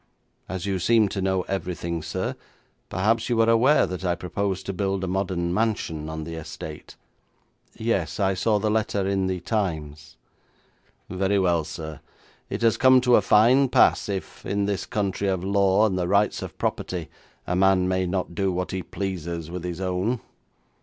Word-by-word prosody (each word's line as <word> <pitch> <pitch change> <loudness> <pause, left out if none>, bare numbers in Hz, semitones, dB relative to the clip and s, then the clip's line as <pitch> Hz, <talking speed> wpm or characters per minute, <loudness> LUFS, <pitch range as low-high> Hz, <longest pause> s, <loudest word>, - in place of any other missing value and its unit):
As 95 0 -4
you 95 -2 -1
seem 110 +2 +3
to 95 - -3
know 95 -1 +1
everything, 85 -3 -3
sir, 80 - -3 0.5
perhaps 110 +6 +1
you 120 -2 +1
are 115 - +4
aware 115 +6 +5
that 90 0 -6
I 90 -1 +1
propose 95 +2 -3
to 100 - -4
build 95 0 -1
a - - -1
modern 90 -2 -1
mansion 90 -8 -1
on 80 0 -5
the 85 +1 -7
estate.' 80 -1 -8 0.8
'Yes; 110 -7 -1
I 95 -1 +2
saw 105 +3 +1
the 105 +1 0
letter 105 -3 0
in 95 -1 0
the 95 -1 -2
Times.' 80 -8 -3 0.9
'Very 95 +2 0
well, 85 -4 +2
sir. 80 0 -7 0.5
It - - -3
has 115 -1 +4
come 130 0 +6
to 125 -1 +5
a - - +5
fine 125 +7 +5
pass 125 -4 +4
if, 95 -2 -5
in 100 0 -1
this 100 -1 -2
country 100 -3 -1
of 95 -2 0
law 100 +1 +3
and 95 -4 0
the 90 - 0
rights 100 +3 +2
of - - -7
property, 85 -4 -2 0.4
a 90 - -1
man 95 0 +3
may 95 0 0
not 90 -1 -2
do 95 +2 0
what 90 0 -3
he 95 - -2
pleases 85 -4 -5
with 90 -1 -5
his 90 -1 -4
own.' 95 +6 -1
95 Hz, 180 wpm, -25 LUFS, 90-105 Hz, 0.9 s, come